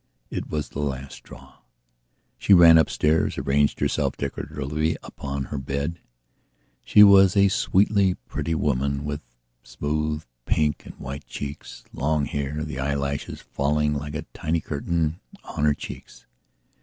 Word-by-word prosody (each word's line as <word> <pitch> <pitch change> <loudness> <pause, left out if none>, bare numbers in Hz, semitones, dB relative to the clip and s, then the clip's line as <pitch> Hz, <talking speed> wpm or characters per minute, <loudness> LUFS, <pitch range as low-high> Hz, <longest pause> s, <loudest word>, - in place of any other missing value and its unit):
It - - -4
was 75 -2 -3
the - - -7
last 70 -2 -3
straw. - - -14 0.8
She 100 - +6
ran 85 -2 +8
upstairs, 80 0 +1
arranged 70 +1 +1
herself - - 0
decoratively 75 +2 -2
upon 70 -1 -5
her 70 - -5
bedshe 70 +5 -3 1.1
was 95 -1 +6
a 100 0 +6
sweetly 100 -3 +2
pretty 80 - -2
woman 70 -1 0
with 75 0 -4 0.4
smooth 75 +5 -3 0.2
pink 75 -1 0
and - - -10
white 70 +2 -8
cheeks, 70 0 -7
long 75 0 0
hair, 70 +2 -3
the 75 -4 -5
eyelashes 70 0 -2
falling 75 +1 0
like 75 +1 -4
a 80 - -3
tiny 80 +2 -1
curtain 80 +2 -2 0.2
on 75 - -2
her 75 -1 +3
cheeks. - - -10
75 Hz, 130 wpm, -24 LUFS, 70-80 Hz, 1.1 s, ran